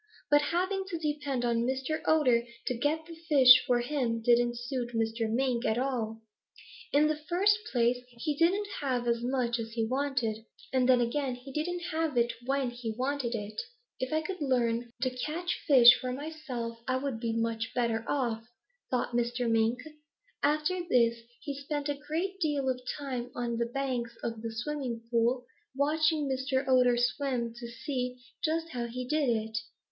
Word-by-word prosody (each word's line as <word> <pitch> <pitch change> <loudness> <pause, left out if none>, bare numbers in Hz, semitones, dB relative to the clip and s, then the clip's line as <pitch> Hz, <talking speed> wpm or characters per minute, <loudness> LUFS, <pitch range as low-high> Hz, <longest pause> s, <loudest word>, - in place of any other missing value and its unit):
"But 290 0 +6
having 370 +6 0
to 355 -4 -3
depend 295 -5 -2
on 235 -1 +2
Mr. 265 +5 -1
Otter 255 -7 +4 0.2
to - - 0
get 300 +6 0
the 335 - -10 0.2
fish 255 -4 +8
for 245 -1 +3
him 245 -3 -1
didn't 240 +1 +3
suit 240 -1 -4
Mr. 225 0 0
Mink 245 0 +1
at 220 - +1
all. 230 -4 -2 0.7
In 290 +2 +5
the 310 0 +2
first 400 +4 +4
place, 240 0 +2
he 250 +5 -3
didn't 370 +7 +2
have 255 -4 -1
as 235 0 +1
much 245 -1 0
as 225 0 -5
he 225 -1 0
wanted. 250 -4 -1 0.3
And 260 -1 +3
then 250 -1 +6
again 255 +2 -1
he 255 +2 -11
didn't 345 +4 -2
have 320 -4 -1
it 235 0 +3
when 270 -2 +1
he 240 -2 -5
wanted 260 -2 -1
it. 210 0 -4 0.4
'If 255 - -2
I 310 0 +2
could 370 +1 -5
learn 240 -3 +1
to 255 - +1
catch 325 +7 -3
fish 245 -4 +9
for 255 - -2
myself, 255 -5 -5
I 255 0 +1
would 265 -3 -3
be 230 -1 -1
much 230 0 -1
better 230 -2 +1
off,' 235 -5 -1 0.4
thought 250 -1 0
Mr. 240 0 0
Mink. 225 +1 +2 0.6
After 305 +5 +1
this 235 -7 +3 0.2
he 290 -2 -4
spent 285 +1 -3
a - - +2
great 370 +5 -2
deal 290 -5 0
of 255 -1 -1 0.2
time 255 -4 -4
on 235 -1 -2
the 235 0 0
banks 245 -2 -2
of 230 -1 -3
the 230 0 -4
Smiling 240 -1 -4
Pool 240 +2 +2 0.3
watching 305 +1 +2
Mr. 265 0 -1
Otter 250 -2 +4
swim 245 -1 0
to 235 0 -8
see 250 0 -4 0.3
just 325 +1 0
how 245 -5 -3
he 250 +1 -5
did 300 -1 +1
it. 220 -1 0
255 Hz, 175 wpm, -30 LUFS, 235-290 Hz, 0.7 s, fish